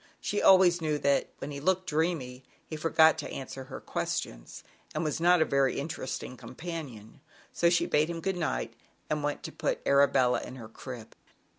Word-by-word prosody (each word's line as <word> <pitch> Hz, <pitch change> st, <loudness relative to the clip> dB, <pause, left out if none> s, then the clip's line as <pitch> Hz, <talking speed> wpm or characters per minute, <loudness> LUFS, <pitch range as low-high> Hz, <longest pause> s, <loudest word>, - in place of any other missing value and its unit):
She 205 Hz, -, -1 dB
also 180 Hz, -3 st, +6 dB
knew 155 Hz, -1 st, +1 dB
that 140 Hz, -1 st, +1 dB
when 145 Hz, -, -6 dB
he 140 Hz, -, -5 dB
looked 185 Hz, +5 st, +1 dB
dreamy, 150 Hz, -6 st, -1 dB, 0.2 s
he 155 Hz, -, -6 dB
forgot 160 Hz, 0 st, +4 dB
to 150 Hz, -, -5 dB
answer 135 Hz, 0 st, -7 dB
her 135 Hz, -, -8 dB
ques -, -, -2 dB
tions, -, -, -7 dB, 0.3 s
and -, -, 0 dB
was 155 Hz, -1 st, -1 dB
not 175 Hz, -1 st, +5 dB
a -, -, -3 dB
very 140 Hz, -2 st, +1 dB
interesting 140 Hz, -3 st, -5 dB
companion, 130 Hz, -2 st, -8 dB, 0.3 s
so 170 Hz, -, +3 dB
she 170 Hz, -, +2 dB
bade 150 Hz, +2 st, +2 dB
him 170 Hz, -1 st, -4 dB
good 190 Hz, +3 st, -1 dB
night 60 Hz, -, -2 dB, 0.4 s
and 150 Hz, 0 st, 0 dB
went 145 Hz, 0 st, -2 dB
in -, -, -35 dB
to -, -, -6 dB
put -, -, -2 dB
Arabella 140 Hz, -3 st, +4 dB
in 130 Hz, -, -8 dB
her 115 Hz, -4 st, -10 dB
crib. 120 Hz, -1 st, -9 dB
150 Hz, 190 wpm, -29 LUFS, 130-165 Hz, 0.4 s, also